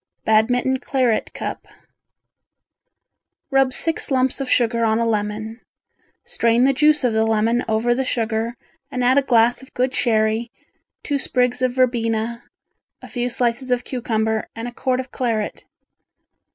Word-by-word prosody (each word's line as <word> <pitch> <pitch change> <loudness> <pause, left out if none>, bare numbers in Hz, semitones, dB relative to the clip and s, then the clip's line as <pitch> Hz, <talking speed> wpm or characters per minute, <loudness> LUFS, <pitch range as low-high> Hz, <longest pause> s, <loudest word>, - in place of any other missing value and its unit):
Badminton 245 +4 +2
Claret 255 -5 0
Cup - - -6 1.8
Rub 270 -1 +3
six 325 +5 +1
lumps 260 0 +1
of 265 - -3
sugar 235 -1 +2
on 220 -1 +2
a 230 - +1
lemon, 215 +1 -3 0.6
strain 230 +1 +2
the 275 +1 +4
juice 300 +2 +3
of 245 -3 +2
the 220 0 +2
lemon 225 +2 +1
over 225 +2 +1
the 265 +2 -1
sugar 230 -1 -2 0.3
and 250 - -3
add 255 +3 +4
a - - +1
glass 240 -2 +3
of 265 - -17
good 255 +1 0
sherry, 220 0 +1 0.5
two 285 -2 -1
sprigs 250 -1 0
of 255 -1 +1
verbena, 235 -2 0 0.6
a - - -9
few 245 0 -2
slices 245 +1 -1
of 245 -1 +1
cucumber 220 -3 -2
and 230 +1 -5
a - - -6
quart 255 +1 -1
of 260 -1 -6
claret. 225 -4 -2
240 Hz, 150 wpm, -21 LUFS, 225-255 Hz, 1.8 s, the